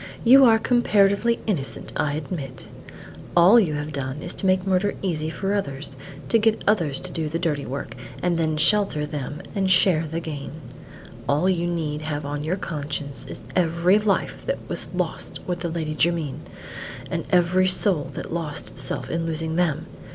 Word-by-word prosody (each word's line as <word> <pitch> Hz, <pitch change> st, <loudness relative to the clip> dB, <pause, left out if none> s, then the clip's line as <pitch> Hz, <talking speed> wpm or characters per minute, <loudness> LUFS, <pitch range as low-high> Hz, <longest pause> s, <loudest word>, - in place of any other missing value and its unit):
you 265 Hz, +3 st, +8 dB
are 225 Hz, -2 st, +6 dB
comparatively 225 Hz, -1 st, +3 dB
innocent, 165 Hz, -11 st, -2 dB
I 145 Hz, -, 0 dB
admit. 145 Hz, -4 st, -5 dB, 0.7 s
All 185 Hz, +8 st, +8 dB
you 165 Hz, -9 st, +1 dB
have 150 Hz, +1 st, -4 dB
done 140 Hz, +1 st, -4 dB
is 175 Hz, -, -1 dB
to 195 Hz, -, -1 dB
make 185 Hz, 0 st, +2 dB
murder 190 Hz, +1 st, +1 dB
easy 160 Hz, -4 st, -1 dB
for 195 Hz, +4 st, -2 dB
others; 140 Hz, -8 st, -2 dB, 0.3 s
to 230 Hz, -, +5 dB
get 220 Hz, 0 st, +2 dB
others 165 Hz, -10 st, +2 dB
to 185 Hz, -, -5 dB
do 160 Hz, -3 st, -2 dB
the 165 Hz, -, -2 dB
dirty 155 Hz, -5 st, -1 dB
work, 135 Hz, +3 st, -5 dB, 0.2 s
and 180 Hz, -1 st, +1 dB
then 160 Hz, -2 st, 0 dB
shelter 160 Hz, -2 st, +4 dB
them 145 Hz, 0 st, -5 dB
and 195 Hz, -2 st, 0 dB
share 180 Hz, -3 st, +4 dB
the 160 Hz, +2 st, -3 dB
gain; 150 Hz, -4 st, -6 dB, 0.8 s
all 150 Hz, +6 st, +2 dB
you 175 Hz, -2 st, +1 dB
need 155 Hz, -3 st, -2 dB
have 150 Hz, -1 st, -3 dB
on 145 Hz, +1 st, -3 dB
your 170 Hz, +5 st, -1 dB
conscience 145 Hz, -5 st, -4 dB
is -, -, -8 dB
every 175 Hz, +3 st, +3 dB
life 210 Hz, -2 st, -1 dB
that -, -, 0 dB
was -, -, -4 dB
lost -, -, -3 dB
with 175 Hz, -1 st, -2 dB
the 170 Hz, -, -3 dB
Lady 160 Hz, -2 st, -3 dB
Jermyn, 160 Hz, -2 st, 0 dB, 0.7 s
and -, -, -2 dB
every 180 Hz, +1 st, +3 dB
soul 185 Hz, -5 st, +2 dB
that -, -, -6 dB
lost 160 Hz, -3 st, -3 dB
itself 135 Hz, -5 st, -2 dB
in 165 Hz, 0 st, -2 dB
losing 160 Hz, 0 st, -2 dB
them. 165 Hz, -3 st, 0 dB
165 Hz, 175 wpm, -24 LUFS, 150-190 Hz, 0.8 s, you